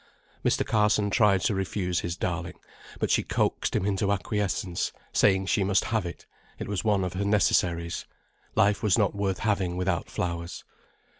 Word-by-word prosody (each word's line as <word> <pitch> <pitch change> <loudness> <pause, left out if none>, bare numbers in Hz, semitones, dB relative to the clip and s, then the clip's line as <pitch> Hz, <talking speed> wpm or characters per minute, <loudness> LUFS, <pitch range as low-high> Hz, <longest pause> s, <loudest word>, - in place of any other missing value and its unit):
Mr. - - +2
Carson 105 -1 +2
tried 105 -5 +4
to 105 - +1
refuse 95 -2 -1
his 85 0 -4
darling, 85 -1 -3 0.4
but - - 0
she - - +4
coaxed - - -1
him - - +1
into 100 0 +1
acquiescence, 100 -3 -1 0.2
saying 95 0 +3
she 100 +1 +1
must 95 0 +2
have 110 -5 0
it, 85 - -9 0.3
it - - -5
was 100 -2 -2
one 105 -3 +2
of 90 -1 -3
her 95 +2 -2
necessaries. 85 -5 +1 0.5
Life 100 +1 +3
was 105 -1 +3
not 105 -4 +2
worth 100 -2 -1
having 95 -5 0
without 90 -2 -1
flowers. 85 -1 -4
95 Hz, 165 wpm, -27 LUFS, 90-105 Hz, 0.5 s, tried